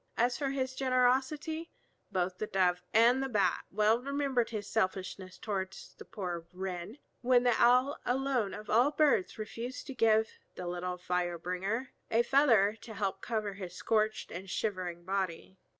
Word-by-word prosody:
As 245 +1 +2
for 280 -2 -1
his 260 -1 -2
generosity, 265 +5 +1 0.4
both 180 -1 -1
the 215 - -2
Dove 180 -2 +2
and 235 +4 +5
the 270 - -2
Bat 195 -6 +1
well 215 +3 +3
remembered 275 -3 0
his 210 -3 -5
selfishness 185 -3 -2
towards 190 -3 -4
the - - -12
poor 175 -4 -5
Wren, 185 +4 -5 0.2
when 245 0 +4
the 245 -1 +4
Owl 250 +4 +4
alone 250 -5 0
of 215 - -9
all 240 +6 +4
the 295 - -14
birds 285 -12 +3
refused 230 +4 -6
to 270 - -6
give 220 -2 +4 0.3
the 180 - -6
little 180 +1 -3
fire 180 -1 -1
bringer 195 +9 -3 0.2
a 230 +1 +3
feather 235 -6 +4
to 220 - -9
help 195 -1 -2
cover 215 -3 -2
his 190 -2 -8
scorched 215 -1 0
and 185 +2 -7
shivering 180 -4 -3
body. 190 -1 -3
215 Hz, 165 wpm, -32 LUFS, 185-250 Hz, 0.4 s, and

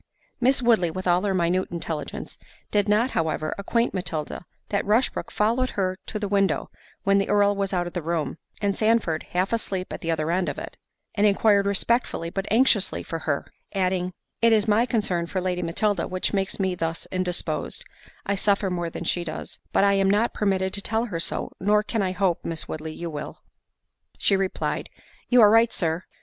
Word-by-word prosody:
Miss 255 +1 +3
Woodley, 220 -8 +4
with 185 +3 -5
all 175 0 +3
her 200 -1 0
minute 180 +1 +1
intelligence, 165 -3 -5 0.3
did 205 0 +2
not 225 +5 +3
however 155 -1 -1
acquaint 230 +4 0
Matilda, 175 -3 -4 0.2
that 200 - 0
Rushbrook 220 +5 +1
followed 235 +5 +1
her 185 -1 +1
to 215 - -3
the 210 -1 -2
window 195 -4 +1 0.3
when 200 0 +4
the 195 - -1
Earl 205 0 +4
was 195 -1 -1
out 180 -2 0
of 175 - -6
the 175 - -2
room, 165 0 -2 0.2
and 200 -1 +1
Sandford 215 -8 +2
half 185 +4 +1
asleep 190 -5 -2
at - - -6
the 165 - -4
other 160 0 0
end 180 +1 +1
of - - -5
it, - - -7 0.4
and 210 0 +3
inquired 200 0 +4
respectfully 200 -4 +1
but 195 +2 -4
anxiously 225 -3 +3
for 165 -2 -4
her; 145 -3 -1 0.3
adding, 185 -1 0 0.3
"It 230 0 +5
is 215 0 +3
my 220 +3 +3
concern 185 -8 0
for 185 - -2
Lady 180 -1 -1
Matilda 180 +2 0
which 185 +2 -2
makes 195 0 -1
me 190 -1 +1
thus 165 -1 -3
indisposed: 185 -1 -2 0.4
I 200 - 0
suffer 200 -1 +1
more 175 -1 -2
than 165 - -6
she 175 +1 0
does; 155 -2 -7
but - - +3
I 200 0 +5
am 195 -1 +3
not 210 +4 +2
permitted 190 -2 0
to 200 - -1
tell 220 +3 0
her 175 -8 -4
so, 170 - -1
nor 210 +2 +3
can 220 0 -1
I 185 -1 0
hope, 185 -2 0
Miss 165 -2 -3
Woodley, 155 0 -5
you 170 +1 -5
will." 150 -1 -7 0.7
She 200 - +3
replied, 190 -1 -2 0.4
"You 245 -1 +6
are 210 - +7
right, 225 +1 +5
Sir." 165 0 -1
195 Hz, 195 wpm, -25 LUFS, 175-210 Hz, 0.7 s, are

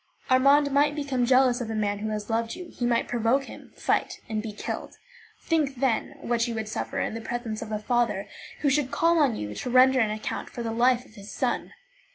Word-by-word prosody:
Armand 280 +2 +5
might 290 +1 +3
become 275 -5 -1
jealous 255 -1 +4
of 230 - -4
a 220 - -3
man 205 -1 -1
who 215 +1 -3
has 210 -1 -4
loved 230 0 -1
you; 360 -2 -9
he 240 - -2
might 235 -1 +1
provoke 240 +3 +1
him, - - -12
fight, - - 0 0.2
be 220 0 -5
killed. 205 - -6 0.5
Think, 305 -5 +1
then, 265 +2 0
what 235 -2 0
you 235 - -3
would 220 -1 -3
suffer 215 - -3
in - - -1
the 225 - -5
presence 235 -2 -4
of 220 - -6
a 215 - 0
father 215 -2 0 0.3
who 290 - +3
should 275 -1 +1
call 335 +3 +3
on 275 -7 +3
you 105 - -5
to 250 - -5
render 255 +1 +6
an 220 -3 +3
account 215 0 -4
for 240 - -6
the 225 - -2
life 245 +2 +2
of - - -20
his 205 -2 -11
son! - - -2
240 Hz, 220 wpm, -26 LUFS, 220-270 Hz, 0.5 s, render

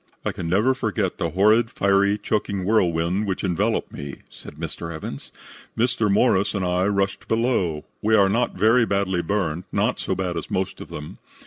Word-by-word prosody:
"I - - +1
can 85 - -5
never 105 +9 +3
forget 110 -6 -2
the 85 -3 0
horrid, 110 +6 +3
fiery, 100 -1 +2
choking 100 -2 -2
whirlwind 90 -1 +1
which 95 - -2
enveloped 90 -4 0
me," 70 -1 -7
said - - -12
Mr. 85 +1 -6
Evans. 80 -1 -7 0.5
"Mr. 115 -3 +1
Morris 100 -1 +3
and 95 -2 -1
I 90 +1 +1
rushed 100 -1 -1
below. 110 -10 0 0.2
We 110 +1 +3
are 100 -2 +5
not 115 +5 0
very 110 +5 +4
badly 100 -4 0
burned, 90 -2 -2
not - - 0
so - - -1
bad 90 -3 -2
as 85 - -5
most 95 0 -2
of - - -9
them. 75 0 -8
100 Hz, 180 wpm, -23 LUFS, 90-110 Hz, 0.5 s, are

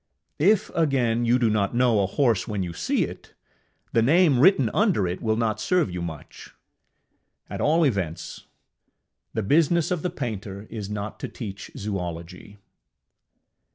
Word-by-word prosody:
If, 205 +6 +3
again, 125 -7 +1
you 120 +2 +4
do 120 -2 +2
not 105 0 0
know 120 -4 +3
a 95 - +1
horse 115 -1 +1
when 105 -4 -2
you 85 -2 -5
see - - 0
it, - - -9 0.6
the 115 - +4
name 150 +1 +4
written 135 - +5
under 200 - +2
it 90 +1 -4
will 110 -1 +1
not 115 -1 -1
serve 180 - +1
you 90 0 -4
much. 80 -4 -9 1.0
At - - -4
all 165 +3 +3
events, 90 - -2 0.9
the 110 - 0
business 165 - +2
of 175 -3 0
the 180 - -1
painter 105 - -5
is 105 -3 -5
not 105 0 -5
to - - -4
teach 100 -5 -8
zoology. 90 0 -6
115 Hz, 155 wpm, -25 LUFS, 100-145 Hz, 1.0 s, written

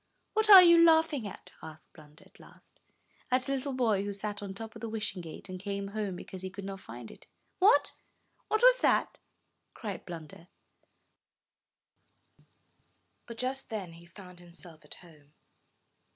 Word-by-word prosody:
'What 435 0 +1
are 385 -3 +12
you 340 -1 +7
laughing 320 -7 +3
at?'' 195 - -11
asked 155 0 -13
Blunder, 150 -2 -17
at - - -23
last. - - -20 0.5
At 255 +1 0
a - - -2
little 275 +1 -3
boy 225 -7 +1
who 205 0 -4
sat 205 +1 -5
on 200 - -6
the - - -6
top 220 +1 -8
of 225 - -11
the 230 - -5
Wishing 210 -4 -4
Gate, 165 +2 -10
and 185 -1 -7
came 200 0 -5
home 205 -2 -4
because 185 +1 -9
he 190 - -5
could 195 +1 -9
not 195 0 -7
find 120 -6 -11
it." - - -17 0.3
''What? 410 +5 +4 0.6
what's - - +4
that?" - - +1 0.6
cried 205 -5 -7
Blunder; 165 -1 -10 2.8
but 235 -1 -9
just 260 +2 -3
then 200 -7 -6
he 170 +1 -15
found 180 0 -14
himself 170 -2 -15
at - - -9
home. 150 -3 -20
200 Hz, 165 wpm, -30 LUFS, 175-255 Hz, 2.8 s, are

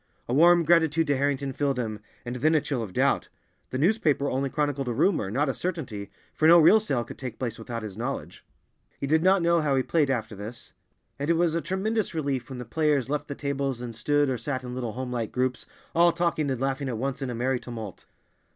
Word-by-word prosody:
A 120 - -2
warm 170 +4 +6
gratitude 165 -1 +3
to 145 -1 +1
Harrington 140 0 0
filled 140 -1 0
him, 110 -4 -3 0.3
and 120 +1 -4
then 155 +6 +3
a 155 - +4
chill 135 -4 -2
of 105 -4 -5
doubt. - - +1 0.4
The 130 - -3
newspaper 150 -4 +2
only 135 +1 0
chronicled 145 -2 -1
a 120 - 0
rumor, 120 - +1
not 140 +8 0
a 135 - 0
certainty, 130 - -4 0.2
for 155 - +3
no 170 +1 +9
real 170 +7 +7
sale 135 - -1
could 120 - -11
take 125 -4 -6
place 115 -3 -4
without 115 0 -5
his 105 -3 -7
knowledge. 115 - -5 0.6
He - - -2
did 160 +3 +2
not 190 -1 +4
know 170 0 +3
how 145 -3 +1
he 130 - +2
played 150 -2 +1
after 115 -4 -2
this, 110 +4 -9 0.5
and 145 +3 -2
it 170 - +4
was 170 -1 +2
a 170 - 0
tremendous 200 +2 -1
relief 140 -5 -2
when 130 - -6
the 125 - -6
players 145 0 +1
left 150 0 -2
the 140 - -5
tables 140 -3 -2
and 120 -2 -6
stood 145 +5 +2
or 130 -3 -1
sat 130 +2 -3
in 125 -1 -6
little 120 -3 -4
home 130 0 -5
like 115 -3 -2
groups, 130 0 -1 0.3
all 170 +1 +5
talking 170 -4 0
and 130 -3 -2
laughing 135 0 -1
at 120 - -3
once 135 +3 -3
in 135 - -2
a 120 - -3
merry 125 +2 0
tumult. 110 -6 -8
135 Hz, 235 wpm, -26 LUFS, 125-155 Hz, 0.6 s, no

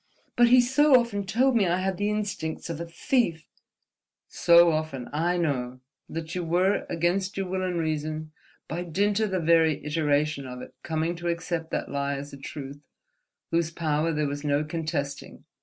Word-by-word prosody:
"But 240 0 +6
he 250 +1 +7
so 260 +2 +5
often 205 -5 -3
told 255 +5 +2
me 205 -5 +3
I 175 +1 +2
had 190 0 -1
the 205 +1 0
instincts 200 -7 -3
of 165 - -5
a 170 - -5
thief—!" 165 - 0 0.8
"So 170 0 +6
often—I 155 +3 -1
know—that 135 +2 -4
you 180 - -2
were, 180 +4 +1
against 180 +4 0
your 195 - -1
will 185 +1 -2
and 180 -2 -1
reason, 155 0 -3 0.4
by 170 +3 -3
dint 200 +5 0
of 215 -1 +1
the 190 -1 0
very 160 -2 +3
iteration 150 -2 0
of 125 0 -7
it, - - -12
coming 160 +1 -1
to 175 +1 -5
accept 170 -1 -2
that - - -3
lie 140 0 -1
as 140 +1 -7
a - - -8
truth 140 0 -8 0.7
whose 165 -1 +1
power 160 -1 0
there 150 -1 0
was 145 +1 -4
no 145 0 +1
contesting. 155 -3 -4
165 Hz, 175 wpm, -26 LUFS, 150-185 Hz, 0.8 s, he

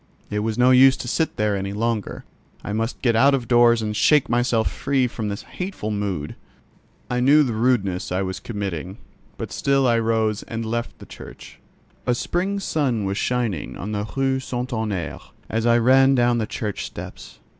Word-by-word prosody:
It 105 - -1
was 110 0 -2
no 125 +1 +5
use 130 +1 +6
to - - -6
sit 160 +6 -1
there 105 -1 +1
any 100 0 -3
longer: 110 -1 -2 0.4
I 105 - -4
must 115 +3 -3
get 120 -3 +3
out 140 +4 +5
of 125 -4 -4
doors 120 -1 +4
and 105 0 -3
shake 150 +5 +3
myself 120 -1 +1
free 135 -2 0
from 115 -3 -4
this 100 - -5
hateful 180 - -5
mood. 100 -7 -3 0.7
I 125 - -1
knew 145 +4 +5
the 125 -5 -2
rudeness 110 -7 0
I 95 +2 0
was 95 -1 -4
committing, 95 -3 -5 0.4
but - - -6
still 135 -1 +1
I 120 -2 +3
rose 110 -2 0
and 115 0 -5
left 115 +1 -3
the - - -12
church. - - -12 0.5
A 125 - +3
spring 190 +9 -1
sun 135 - -1
was 95 +2 -2
shining 120 -10 -2
on 105 - -5
the 105 0 -3
Rue 135 -1 +1
St. 125 -1 -4
Honorķ, 105 -8 -3 0.3
as 115 +1 0
I 120 0 +5
ran 135 +3 +5
down 120 -1 +2
the 110 - -2
church 105 -2 -4
steps. - - -9
115 Hz, 190 wpm, -22 LUFS, 105-130 Hz, 0.7 s, use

